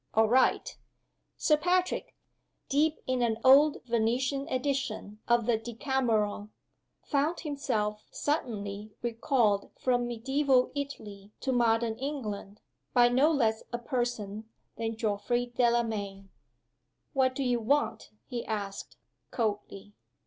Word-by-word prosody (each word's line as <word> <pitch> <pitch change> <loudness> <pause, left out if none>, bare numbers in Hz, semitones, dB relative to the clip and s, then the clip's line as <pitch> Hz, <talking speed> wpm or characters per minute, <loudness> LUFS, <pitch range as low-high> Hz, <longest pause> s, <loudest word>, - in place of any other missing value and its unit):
"All 220 0 +5
right!" 255 +4 +2 0.6
Sir 300 - +3
Patrick, 360 +3 0 0.5
deep 300 +3 +3
in 255 -1 0
an 230 -2 +1
old 285 +3 +6
Venetian 250 +4 0
edition 255 -6 -2
of 235 -1 +3
The 230 -2 +2
Decameron, 225 -4 -1 0.5
found 300 +3 0
himself 230 -9 -2
suddenly 210 -8 -3
recalled 230 -3 +1
from 245 -1 +1
medieval 260 +2 +1
Italy 210 -8 -7
to 265 - -1
modern 230 -2 +2
England, 215 -8 -5 0.3
by 240 -1 +6
no 265 +5 +4
less 225 -7 +1
a 240 - -1
person 235 -4 -3 0.3
than 225 -1 -3
Geoffrey 230 +3 0
Delamayn. 220 -5 0 0.8
"What 260 -1 +2
do 275 - -1
you 245 -2 +1
want?" 280 +6 0 0.2
he 245 -3 -4
asked, 200 -2 -5 0.3
coldly. 205 -2 -3
240 Hz, 115 wpm, -29 LUFS, 215-270 Hz, 0.8 s, old